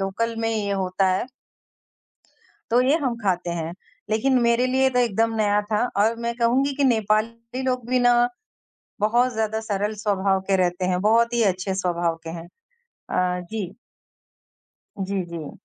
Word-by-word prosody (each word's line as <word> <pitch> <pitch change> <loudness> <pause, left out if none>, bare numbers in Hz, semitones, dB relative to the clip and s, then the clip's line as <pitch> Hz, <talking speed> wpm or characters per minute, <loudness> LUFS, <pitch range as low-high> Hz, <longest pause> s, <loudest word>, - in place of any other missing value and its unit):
Local 225 +4 -2
में 225 - 0
ये 210 -3 -1
होता 190 0 0
है, 185 - -1 1.4
तो 240 +2 +4
ये 275 +5 +3
हम 250 -3 0
खाते 180 -3 0
हैं। 170 -1 -3 0.4
लेकिन 250 +4 +2
मेरे 235 +2 +3
लिए 265 +1 +3
तो 250 - +1
एकदम 225 -1 +1
नया 210 -1 +2
था 215 +3 +2 0.2
और 225 +1 +2
मैं 235 0 -1
कहूँगी 260 +4 +2
कि 285 - 0
नेपाली 230 +1 0
लोग 250 -2 -1
भी 255 0 +3
ना 245 0 +4 0.7
बहुत 240 +4 +2
ज़्यादा 220 0 -1
सरल 210 -1 -2
स्वभाव 195 -2 +1
के 195 - +3
रहते 180 0 0
हैं, 180 0 0
बहुत 230 +3 +3
ही 235 -1 +2
अच्छे 190 -1 0
स्वभाव 175 -3 0
के 165 - -6
हैं। 165 0 -7 0.7
अ, 180 0 0
जी। 205 -3 -5 1.2
जी, 195 0 -2
जी। 165 -3 -8
215 Hz, 160 wpm, -23 LUFS, 190-235 Hz, 1.4 s, तो